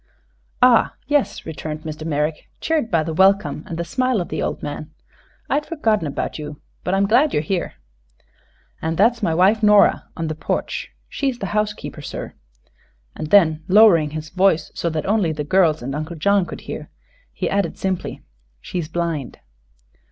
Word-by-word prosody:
"Ah, 250 Hz, -2 st, +5 dB
yes," 290 Hz, -2 st, 0 dB
returned 155 Hz, -1 st, -5 dB
Mr. 155 Hz, 0 st, -6 dB
Merrick, 150 Hz, 0 st, -2 dB
cheered 310 Hz, -8 st, 0 dB
by 165 Hz, -5 st, +2 dB
the 160 Hz, +1 st, -4 dB
welcome 195 Hz, +4 st, +3 dB
and 170 Hz, -5 st, -5 dB
the 170 Hz, -, -2 dB
smile 255 Hz, +5 st, 0 dB
of 175 Hz, -, -4 dB
the -, -, -3 dB
old -, -, -3 dB
man. 150 Hz, +1 st, -5 dB, 0.6 s
"I'd 290 Hz, +2 st, +1 dB
forgotten 220 Hz, -, 0 dB
about 140 Hz, -, -4 dB
you, 150 Hz, -1 st, -7 dB, 0.2 s
but 180 Hz, -, 0 dB
I'm 195 Hz, +1 st, +3 dB
glad 250 Hz, +9 st, +3 dB
you're 150 Hz, -, +1 dB
here." 180 Hz, +2 st, -2 dB, 1.1 s
"And 160 Hz, 0 st, -2 dB
that 215 Hz, +6 st, +6 dB
is -, -, -17 dB
my 165 Hz, -6 st, +1 dB
wife 195 Hz, +5 st, +4 dB
Nora, 210 Hz, -1 st, +5 dB
on 165 Hz, -, -2 dB
the 155 Hz, -, -2 dB
porch. 155 Hz, -, -3 dB, 0.2 s
She's 270 Hz, -3 st, -2 dB
the 200 Hz, -, -4 dB
housekeeper, 210 Hz, -7 st, -2 dB
sir." -, -, -6 dB, 0.8 s
And 155 Hz, -, -5 dB
then, 160 Hz, -4 st, +4 dB
lowering 190 Hz, -6 st, +6 dB
his 155 Hz, +1 st, -6 dB
voice 185 Hz, -3 st, +2 dB
so 170 Hz, -, -2 dB
that 155 Hz, -2 st, -3 dB
only 200 Hz, -5 st, +2 dB
the 150 Hz, -1 st, -3 dB
girls 160 Hz, -3 st, +2 dB
and 135 Hz, +2 st, -4 dB
Uncle 155 Hz, +4 st, -4 dB
John 195 Hz, +3 st, +2 dB
could -, -, -8 dB
hear, -, -, -7 dB, 0.4 s
he -, -, -3 dB
added 200 Hz, 0 st, -1 dB
simply: 190 Hz, -2 st, -3 dB, 0.4 s
"She's 170 Hz, -, -4 dB
blind." 165 Hz, -4 st, -3 dB
175 Hz, 175 wpm, -21 LUFS, 155-210 Hz, 1.1 s, that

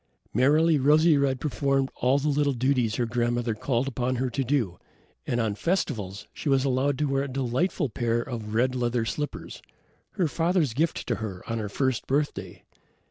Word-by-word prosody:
Merrily 150 Hz, +6 st, +4 dB
Rosy 155 Hz, +4 st, +5 dB
red 140 Hz, -2 st, +1 dB
performed 135 Hz, -2 st, 0 dB
all 130 Hz, +3 st, +2 dB
the 145 Hz, +2 st, -1 dB
little 145 Hz, -1 st, +2 dB
duties 125 Hz, -3 st, +1 dB
her 120 Hz, -, 0 dB
grandmother 120 Hz, 0 st, 0 dB
called 120 Hz, +4 st, -1 dB
upon 130 Hz, -1 st, -1 dB
her 125 Hz, 0 st, -1 dB
to 135 Hz, -, -1 dB
do, 120 Hz, -10 st, -1 dB, 0.5 s
and 120 Hz, -, 0 dB
on 110 Hz, -3 st, 0 dB
festivals 105 Hz, -, -2 dB
she 150 Hz, -, -4 dB
was 135 Hz, -1 st, +3 dB
allowed 135 Hz, +1 st, +1 dB
to 150 Hz, -, 0 dB
wear 135 Hz, -1 st, 0 dB
a 140 Hz, -, -2 dB
delightful 135 Hz, +6 st, -1 dB
pair 120 Hz, 0 st, -1 dB
of 115 Hz, -3 st, -5 dB
red 125 Hz, +2 st, +2 dB
leather 120 Hz, -2 st, 0 dB
slippers, 145 Hz, +5 st, -5 dB, 0.5 s
her 180 Hz, -5 st, +1 dB
father's 165 Hz, -4 st, +1 dB
gift 160 Hz, +6 st, -1 dB
to 120 Hz, -, -1 dB
her 100 Hz, -5 st, -6 dB
on 115 Hz, 0 st, -2 dB
her 105 Hz, -2 st, -3 dB
first 130 Hz, +2 st, -1 dB
birthday. 145 Hz, +2 st, -2 dB
130 Hz, 180 wpm, -26 LUFS, 120-145 Hz, 0.5 s, Rosy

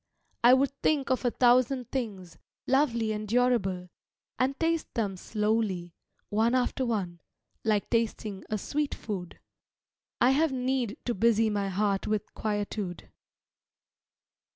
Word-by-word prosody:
I 245 Hz, +2 st, +8 dB
would 275 Hz, +1 st, +2 dB
think 280 Hz, -3 st, +1 dB
of 255 Hz, -, +1 dB
a -, -, +4 dB
thousand 250 Hz, +1 st, +3 dB
things, 200 Hz, -10 st, -4 dB, 0.3 s
Lovely 240 Hz, -5 st, +2 dB
and 215 Hz, 0 st, -3 dB
durable, 205 Hz, -6 st, +1 dB, 0.5 s
and 270 Hz, +2 st, +1 dB
taste 330 Hz, 0 st, 0 dB
them 205 Hz, -4 st, -1 dB
slowly, 210 Hz, -3 st, -1 dB, 0.4 s
One 225 Hz, +4 st, +2 dB
after 255 Hz, 0 st, 0 dB
one, 180 Hz, -7 st, -2 dB, 0.4 s
like 215 Hz, -2 st, +1 dB
tasting 220 Hz, -3 st, -1 dB
a 215 Hz, -, 0 dB
sweet 295 Hz, +8 st, -2 dB
food. 190 Hz, -5 st, -6 dB, 0.8 s
I 245 Hz, -, +5 dB
have 305 Hz, +3 st, +3 dB
need 255 Hz, -3 st, -1 dB
to 240 Hz, -, 0 dB
busy 225 Hz, +1 st, +3 dB
my 200 Hz, -1 st, -1 dB
heart 195 Hz, 0 st, 0 dB
with 210 Hz, 0 st, -2 dB
quietude. 205 Hz, -3 st, -3 dB
225 Hz, 130 wpm, -28 LUFS, 205-255 Hz, 0.8 s, I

